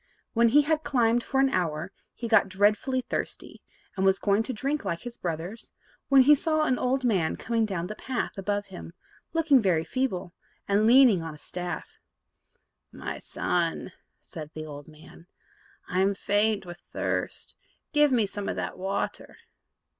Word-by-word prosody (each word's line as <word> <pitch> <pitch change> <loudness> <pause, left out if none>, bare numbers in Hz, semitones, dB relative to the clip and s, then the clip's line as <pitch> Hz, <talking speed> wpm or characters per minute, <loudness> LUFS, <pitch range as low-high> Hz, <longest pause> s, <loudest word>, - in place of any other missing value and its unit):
When 235 0 +4
he 290 +5 +5
had 310 +1 0
climbed 240 -2 +2
for 270 - -1
an 270 0 +4
hour, 165 - -1 0.2
he 235 - -5
got 225 -3 +4
dreadfully 210 +7 +2
thirsty, 250 - -5 0.3
and 190 - -1
was 190 0 +4
going 200 +1 +2
to 240 - -3
drink 275 +5 -2
like 170 -4 -3
his 245 -1 -8
brothers, 175 +6 -5 0.4
when 270 -1 +7
he 295 +3 +7
saw 310 +2 +1
an 260 -5 +1
old 260 +1 0
man 185 -9 +1
coming 230 -2 0
down 180 -4 -3
the 205 - -5
path 255 +3 -4
above 205 +1 -2
him, 85 0 -9 0.4
looking 305 -5 +4
very 175 -6 +2
feeble, 185 -7 -2 0.3
and 205 +2 +3
leaning 240 -6 +6
on 160 -2 -6
a - - -14
staff. 175 +3 -6 0.9
"My - - -6
son," 175 +1 -2 0.3
said 155 -2 -9
the 155 0 -5
old 145 -1 -9
man, 155 +2 -16 0.6
"I 180 - -1
am 195 +1 +2
faint 205 +1 +1
with 175 0 -9
thirst, - - -4 0.4
give 295 -1 +5
me 235 -4 +3
some 200 0 -4
of - - -2
that - - -4
water." 195 +2 -3
205 Hz, 170 wpm, -27 LUFS, 180-255 Hz, 0.9 s, when